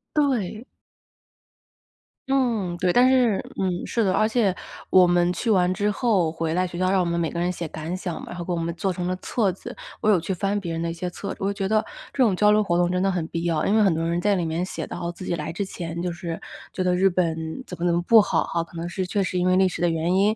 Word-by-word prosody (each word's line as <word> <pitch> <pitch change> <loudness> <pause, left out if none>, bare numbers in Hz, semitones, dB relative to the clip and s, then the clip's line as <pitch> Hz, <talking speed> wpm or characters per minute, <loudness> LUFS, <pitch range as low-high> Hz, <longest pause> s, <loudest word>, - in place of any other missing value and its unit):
对。 240 -7 0 1.7
嗯， 230 -10 +1
对。 180 0 +1
但 250 +4 +5
是 245 -6 +3 0.2
嗯， 185 -2 -1
是 230 - 0
的。 190 -2 +2
而 215 +2 +3
且 220 -5 +2 0.4
我 185 -1 +6
们 175 0 +3
去 230 +5 -2
完 185 -3 +3
之 205 +1 0
后， 200 -6 +1
回 160 0 -2
来 185 +1 +1
学 175 - -8
校， 185 +1 +1
让 195 - +3
我 180 - +2
们 170 0 -1
每 165 -2 0
个 170 - -4
人 175 +1 +1
写 175 -2 -4
感 160 +3 -5
想 180 -3 -4
嘛， - - -8
然 - - -7
后 175 - -4
给 180 - -4
我 170 - 0
们 165 0 -2
做 190 +2 -1
成 180 0 -3
了 185 - -1
册 215 -5 0
子。 - - -9 0.3
我 215 - +2
有 190 -5 +5
去 180 +4 -3
翻 200 +3 -1
别 170 -4 -4
人 165 - -3
的 170 - -1
一 - - -4
些 180 +1 -4
册 200 - -7
子。 - - -14
我 200 +1 -1
觉 195 0 -2
得 215 0 +2 0.3
这 270 - -1
种 210 -7 +4
交 210 +2 +4
流 215 0 +4
活 175 -4 +1
动 175 0 +2
真 180 0 0
的 195 - +2
很 175 -4 -1
必 170 0 -4
要， 165 -3 0
因 200 - +2
为 - - +5
很 195 -5 +4
多 165 - -1
人 170 +1 0
在 205 +1 +2
里 175 -2 -1
面 165 +3 -1
写 - - -5
到 170 - -5
自 175 +2 -8
己 175 - -1
来 155 +1 -5
之 200 - -2
前， 170 -3 -5
就 180 -1 -2
是 170 -1 -5 0.3
觉 185 - -1
得 180 0 +2
日 190 +2 +4
本 165 +4 -2
怎 180 - -8
么 175 - -1
怎 170 - +3
么 170 - +1
不 225 +5 +6
好 - - +1
哈。 170 - -2
可 170 +1 -10
能 170 +1 -4
是 185 +1 -3
确 200 0 0
实 180 -1 -1
因 180 - +1
为 185 - +4
历 190 0 +4
史 175 - -6
的 175 - +3
原 165 +2 0
因， 205 +3 +3
180 Hz, 310 characters per minute, -24 LUFS, 170-200 Hz, 1.7 s, 我